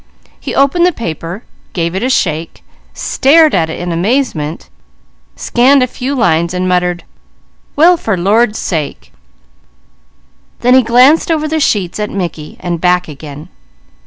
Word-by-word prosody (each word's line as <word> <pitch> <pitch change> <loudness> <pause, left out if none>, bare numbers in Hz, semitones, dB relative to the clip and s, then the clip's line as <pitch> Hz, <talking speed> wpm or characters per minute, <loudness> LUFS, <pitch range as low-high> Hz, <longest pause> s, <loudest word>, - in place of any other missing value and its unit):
He - - -5
opened 280 +6 +3
the - - +2
paper, 175 - -6 0.3
gave 170 -1 -2
it 190 - -3
a 255 - 0
shake, 165 - -2 0.3
stared 310 +3 +3
at 165 -3 +1
it - - -6
in 175 0 -4
amazement, 170 - -2 0.7
scanned 260 +2 +3
a - - +3
few 255 +2 -4
lines 170 -7 +1
and 180 0 -1
muttered: 180 -1 0 0.7
"Well 345 +4 +5
for 220 -10 -2
the 175 - -5
Lord's 215 +2 +2
sake!" 155 -5 -4 1.5
Then 250 +1 +3
he 260 - +6
glanced 250 +8 +4
over 310 -2 0
the 315 +1 -1
sheets 200 - 0
at 210 - -2
Mickey 170 -5 -5
and 175 -2 -4
back 180 0 +2
again. 150 +2 -10
195 Hz, 150 wpm, -13 LUFS, 170-260 Hz, 1.5 s, he